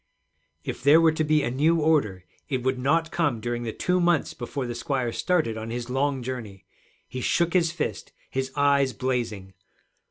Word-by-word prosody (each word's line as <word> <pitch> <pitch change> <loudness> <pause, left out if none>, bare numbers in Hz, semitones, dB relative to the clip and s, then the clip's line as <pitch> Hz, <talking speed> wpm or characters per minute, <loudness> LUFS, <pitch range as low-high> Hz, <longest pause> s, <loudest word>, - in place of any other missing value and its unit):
If - - -5
there 145 +4 +6
were 165 -1 +5
to 155 0 -1
be 155 -1 +2
a 120 - -1
new 155 +6 +2
order, 140 - +1 0.2
it 130 -4 -1
would 130 0 0
not 160 +5 +1
come 145 -9 0
during 120 +1 -3
the 115 -2 -3
two 180 +10 0
months 170 -3 +2
before 130 +2 -5
the 120 - -4
squire 130 -3 -2
started 155 -7 0
on 110 +1 -6
his 120 +1 -4
long 135 0 0
journey! 115 -6 -6 0.4
He 130 - -6
shook 170 +6 +1
his 170 -3 +3
fist, 170 - -4 0.2
his 130 0 -2
eyes 140 -2 +3
blazing. 115 -5 -3
130 Hz, 185 wpm, -25 LUFS, 120-155 Hz, 0.4 s, there